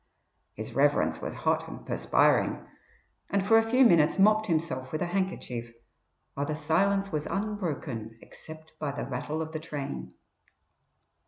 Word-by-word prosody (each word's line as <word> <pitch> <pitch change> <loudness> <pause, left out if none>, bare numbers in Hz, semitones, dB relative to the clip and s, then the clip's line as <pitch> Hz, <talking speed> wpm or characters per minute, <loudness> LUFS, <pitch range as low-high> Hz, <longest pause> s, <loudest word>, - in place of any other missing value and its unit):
His - - -7
Reverence - - +2
was - - -4
hot - - +2
and - - -9
perspiring, - - +2 0.6
and 195 -1 +1
for 225 +2 +6
a 225 0 -1
few 255 +2 +5
minutes 165 -8 +5
mopped 215 +2 +4
himself 155 -7 -1
with 155 +2 -1
a - - 0
handkerchief, 175 -11 -3 0.6
while 140 +1 -2
the 155 - -2
silence 195 +6 +1
was 150 -2 -2
unbroken 155 - -3
except 160 +4 -13
by 150 - -2
the 145 - -4
rattle 150 +5 -3
of 160 - -8
the 160 - -4
train. 140 - -6
160 Hz, 150 wpm, -28 LUFS, 145-195 Hz, 0.6 s, for